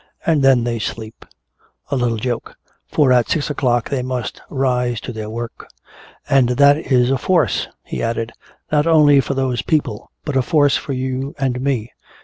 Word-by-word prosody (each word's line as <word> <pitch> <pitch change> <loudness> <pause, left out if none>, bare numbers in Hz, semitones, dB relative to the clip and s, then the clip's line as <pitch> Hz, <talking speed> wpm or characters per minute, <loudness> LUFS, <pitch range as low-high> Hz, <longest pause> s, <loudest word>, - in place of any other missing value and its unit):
And 160 -3 +2
then 135 -3 +4
they 120 -1 -2
sleep! 110 +1 -6 0.6
A - - +1
little 120 -3 0
joke! 120 +1 -4 0.3
For 140 -4 +3
at 120 -3 +2
six 150 -2 0
o'clock 120 -5 0
they 135 -2 0
must 125 -1 -4
rise 125 -3 0
to 125 - -6
their 110 -1 -6
work! 115 +1 -7 0.6
And 130 -3 +3
that 140 +3 +5
is 130 -4 +1
a 135 - +1
force," 165 - +1 0.2
he - - -5
added, 115 0 -2 0.4
"not 150 +1 +2
only 150 -3 +6
for 140 - -3
those 130 -2 0
people 150 -9 -1 0.2
but 150 - -3
a 130 - +4
force 145 +2 +3
for 140 - -3
you 130 +2 -3
and 130 -3 -1
me. 130 -5 -1
130 Hz, 175 wpm, -19 LUFS, 120-140 Hz, 0.6 s, only